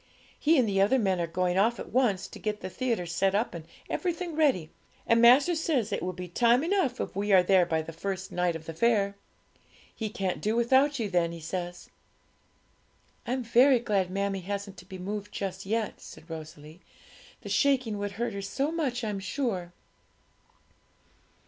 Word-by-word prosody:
He 315 +2 +4
and 250 -4 +3
the 195 -1 +2
other 210 +7 +4
men 190 -6 +1
are 170 - -1
going 180 +2 0
off 230 +4 +2
at - - -8
once, 210 -7 +1
to - - -11
get 210 -1 -3
the 185 - -6
theatre 230 -5 -1
set 190 +3 0
up 220 +4 0
and 165 -2 -7 0.2
everything 350 -2 -3
ready, 260 - +2 0.3
and 230 0 +4
master 260 +8 +6
says 315 -9 0
it - - -1
will 180 - -2
be 180 0 -7
time 235 - +3
enough 345 -8 0
if - - -4
we 205 +1 -1
are 185 -2 +7
there 185 -1 +4
by 160 -1 0
the 165 - -8
first 190 +3 -4
night 180 -1 0
of 160 0 -8
the 165 - -6
fair. 200 +1 +2 0.8
He 220 -2 -3
can't 190 -3 -3
do 215 +2 0
without 265 +5 +3
you 225 -4 -1
then, 175 -3 +1
he 170 - -8
says.' 175 +2 -5 1.4
'I - - -2
am 255 -1 -2
very 250 +3 +5
glad 205 -6 0
mammie 195 +1 -1
hasn't 200 +1 -5
to 180 - -12
be 190 0 -9
moved 205 +2 -5
just 190 -1 -5
yet,' 220 +1 -2
said 160 - -12
Rosalie; 155 +1 -9 0.6
'the - - -7
shaking 260 -7 +2
would 205 0 -3
hurt 230 +2 -2
her 200 - -4
so 270 +10 -2
much, 270 -7 -2
I'm 210 -3 -2
sure.' 190 -3 -3
200 Hz, 190 wpm, -28 LUFS, 180-240 Hz, 1.4 s, are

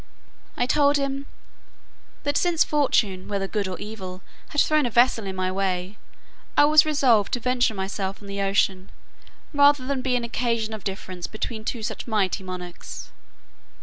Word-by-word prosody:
I 245 - +2
told 285 +2 +3
him, 275 0 -3 1.0
"that 285 0 -1
since 345 -1 +3
fortune, 215 -10 +1
whether 200 -1 -2
good 205 -1 -2
or 185 - -4
evil, 190 -4 -7 0.3
had 295 - -1
thrown 305 -3 +3
a - - -2
vessel 235 -2 +3
in 190 - -4
my 185 0 -1
way, 190 +1 -2 0.6
I 290 - +8
was 310 +1 +6
resolved 255 -9 +3
to 245 - +1
venture 250 -2 +1
myself 195 0 -3
on 205 - -12
the 200 0 -3
ocean, 195 -1 +1 0.6
rather 285 -2 +5
than 270 -1 -1
be 255 -1 0
an 245 - 0
occasion 230 -2 -1
of 215 -3 -7
difference 185 -2 -5
between 220 0 -5
two 225 0 -3
such - - -4
mighty 200 -4 0
monarchs." 180 -1 -8
220 Hz, 165 wpm, -24 LUFS, 195-270 Hz, 1.0 s, I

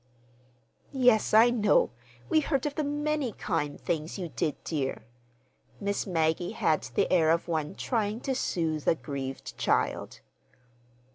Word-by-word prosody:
"Yes, 250 -5 +3
I 225 +3 +7
know. 215 - +3 0.4
We 315 - +4
heard 280 -3 0
of 295 - -1
the 305 - -1
many 295 -3 -1
kind 150 -6 -2
things 160 +2 -3
you 180 -3 -4
did, 155 -2 -1
dear." 140 -7 -2 0.8
Miss 200 0 -2
Maggie 165 0 0
had 155 - +1
the - - +2
air 165 -3 +4
of 165 +1 +2
one 155 -3 -2
trying 220 -3 -1
to 270 - -1
soothe 160 - -1
a - - +5
grieved 135 -4 -6
child. - - 0
180 Hz, 140 wpm, -28 LUFS, 155-245 Hz, 0.8 s, I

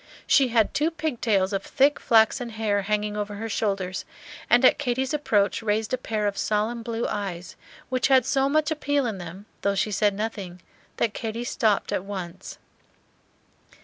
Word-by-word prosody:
She 270 -3 +4
had 230 -3 +2
two 300 +3 +1
pig 310 -6 -4
tails 195 -3 +2
of 195 - 0
thick 280 +7 +2
flaxen 230 +2 +3
hair 215 -2 0
hanging 210 +1 -1
over 205 0 -3
her 225 +2 -5
shoulders, 195 -4 -2 0.5
and 245 +2 +5
at 255 - +5
Katy's 265 0 -1
approach 210 -11 +1
raised 220 +1 -1
a - - +2
pair 215 -4 -2
of 205 -1 -1
solemn 215 +3 0
blue 230 0 -3
eyes, 180 -4 -5 0.3
which 255 -2 +1
had 260 -3 +4
so 270 +1 +1
much 310 +2 +1
appeal 285 -3 0
in 215 -5 -3
them, 180 +3 -9 0.2
though 200 0 +1
she 210 +2 0
said 205 0 +2
nothing, 200 -4 -5 0.4
that 225 -3 0
Katy 225 +1 -4
stopped 220 -4 0
at - - -1
once. 190 -4 -7
220 Hz, 175 wpm, -25 LUFS, 205-255 Hz, 0.5 s, and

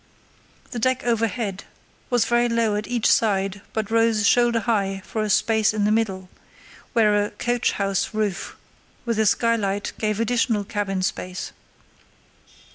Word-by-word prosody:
The 245 - -4
deck 255 +2 +1
overhead 225 -4 -1 0.4
was 245 -2 +2
very 240 0 +2
low 230 -2 +1
at 210 +1 -3
each 240 -2 -2
side 195 -2 +2
but 220 -1 -3
rose 225 -2 +2
shoulder 240 -1 +3
high 195 -5 -1
for 220 - -3
a 215 - -1
space 220 +1 +2
in 210 - 0
the 210 - +2
middle, 195 -4 -1 0.7
where 210 -3 +3
a 205 - -3
"coach 240 +3 -1
house 195 -1 -1
roof" 215 -4 -3 0.5
with 230 -2 -1
a 220 - +3
skylight 205 -3 0
gave 215 -1 -1
additional 230 -2 +1
cabin 195 -2 -2
space. 185 0 -4
215 Hz, 145 wpm, -23 LUFS, 205-230 Hz, 0.7 s, shoulder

